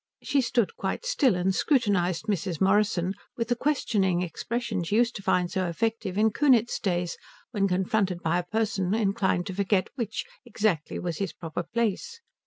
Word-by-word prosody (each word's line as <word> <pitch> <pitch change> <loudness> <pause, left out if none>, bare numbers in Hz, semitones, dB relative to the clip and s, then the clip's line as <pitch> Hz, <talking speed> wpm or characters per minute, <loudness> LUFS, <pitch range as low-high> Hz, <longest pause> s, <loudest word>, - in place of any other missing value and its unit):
She 280 - +2
stood 235 -3 0
quite - - -3
still, 285 - +3
and 180 +2 +1
scrutinized 200 - +1
Mrs. 190 -5 -2
Morrison 195 -2 +2 0.2
with 230 0 -2
the 245 - +2
questioning 205 -10 +1
expression 220 +3 -3
she 185 +5 -1
used 235 +1 +3
to - - -8
find 180 -2 +1
so 185 -3 0
effective 200 +1 -2
in 220 +1 +4
Kunitz 245 -3 +3
days 175 -3 -1 0.3
when 200 -3 +1
confronted 190 -1 0
by 170 +2 +2
a - - -3
person 210 -1 0
inclined 195 -4 +1
to 190 - -5
forget 195 0 +1
which, 230 -5 -3 0.2
exactly, 210 -9 -1
was 175 -3 -4
his 195 -4 -2
proper 165 0 -5
place. 235 - -2
200 Hz, 170 wpm, -27 LUFS, 180-230 Hz, 0.3 s, in